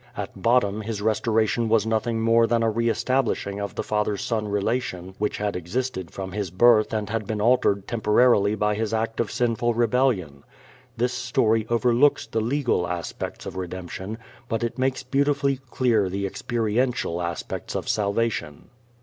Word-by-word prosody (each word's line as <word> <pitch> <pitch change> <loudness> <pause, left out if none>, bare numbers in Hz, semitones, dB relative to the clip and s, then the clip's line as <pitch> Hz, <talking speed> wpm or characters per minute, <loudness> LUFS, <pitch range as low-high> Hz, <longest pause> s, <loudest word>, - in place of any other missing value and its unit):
At - - -6
bottom 110 -3 +2
his 110 -1 -4
restoration 110 +1 +1
was 110 -1 +3
nothing 110 +1 0
more 115 0 +4
than 115 0 +1
a 115 - +2
re 115 +2 +1
establishing 115 -5 0
of 100 0 -4
the - - -2
father 105 -1 0
son 110 -1 -2
relation 100 -3 -2
which 105 0 -1
had 105 0 -2
existed 95 +1 -3
from 95 -1 -6
his 100 -1 -3
birth 110 +4 +4
and 105 -2 -2
had 110 -1 -3
been 110 -1 -2
altered 105 -3 +2
temporarily 110 -2 +3
by 105 0 +1
his 110 +1 -1
act 115 0 -2
of 115 - 0
sinful 120 -1 0
rebellion. 115 - +1 0.5
This 125 +2 0
story 115 -2 +1
overlooks 120 +4 +3
the 110 - -2
legal 120 -6 0
aspects 85 -2 -5
of - - -6
redemption, 95 +3 -6 0.3
but 115 0 -1
it 120 +2 -3
makes 130 0 0
beautifully 140 0 +1
clear 115 -8 +2
the 100 +2 -2
experiential 115 -4 -1
aspects 85 -1 -4
of - - -3
salvation. 100 -7 -1
110 Hz, 160 wpm, -24 LUFS, 100-120 Hz, 0.5 s, more